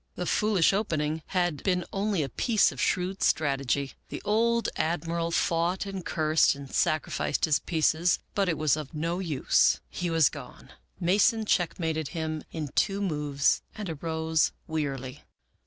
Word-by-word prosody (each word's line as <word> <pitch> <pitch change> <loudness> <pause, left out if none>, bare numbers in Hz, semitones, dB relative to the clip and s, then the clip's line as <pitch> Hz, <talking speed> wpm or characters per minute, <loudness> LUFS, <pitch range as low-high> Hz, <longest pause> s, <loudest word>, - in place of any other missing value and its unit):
The 180 - -3
foolish 200 -2 +2
opening 160 -6 -1
had 175 -5 0
been 180 -2 0
only 195 -4 0
a 135 - -4
piece 220 - +2
of - - -6
shrewd 185 +2 0
strategy. 140 -2 +1 0.2
The - - -5
old 230 +2 +2
Admiral 165 +1 -1
fought 170 +2 0
and 195 -2 -5
cursed 155 -3 +2
and 140 -1 -10
sacrificed 155 -1 0
his 155 -3 +2
pieces, 165 +1 +2 0.2
but 195 -2 +1
it 165 - 0
was 155 -2 +2
of 155 0 -7
no 165 +4 -2
use. 160 -8 +2
He 175 -1 -3
was 165 -4 +4
gone. - - -11 0.3
Mason 205 +5 +3
checkmated 160 -5 0
him 155 -1 -3
in 155 -3 -4
two 195 +7 0
moves 150 -7 +1
and 205 -5 -5
arose 160 0 0
wearily. 135 -5 -4
165 Hz, 150 wpm, -27 LUFS, 155-185 Hz, 0.3 s, was